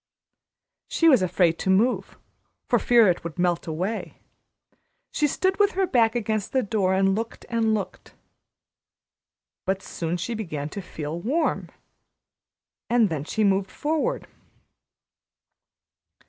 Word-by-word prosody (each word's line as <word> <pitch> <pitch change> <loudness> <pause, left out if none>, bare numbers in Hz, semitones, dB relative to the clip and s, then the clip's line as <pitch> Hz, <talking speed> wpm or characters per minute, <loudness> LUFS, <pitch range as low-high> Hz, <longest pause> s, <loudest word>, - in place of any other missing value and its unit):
She 330 - +2
was 265 -10 +6
afraid 175 -2 +2
to - - -2
move, 215 +7 +1 0.5
for - - +3
fear 235 -3 +5
it 180 - +1
would 170 0 -7
melt 175 -1 0
away. 185 +8 -3 0.9
She 300 - +1
stood 375 +7 0
with 405 0 +3
her 385 +1 +1
back 235 -8 +2
against 215 -3 -2
the 260 -1 +2
door 195 -3 +1
and 195 0 +3
looked 225 +3 -4
and 225 -2 +1
looked. 200 -3 -6 1.5
But 190 0 -2
soon 170 +1 -3
she 205 +7 -3
began 155 -10 -4
to 200 - -6
feel 160 -2 -6
warm, 290 - -1 1.2
and 230 -3 +4
then 150 -3 -3
she 220 +6 -1
moved 195 -1 +2
forward. 320 +12 -2
205 Hz, 130 wpm, -25 LUFS, 180-240 Hz, 1.5 s, was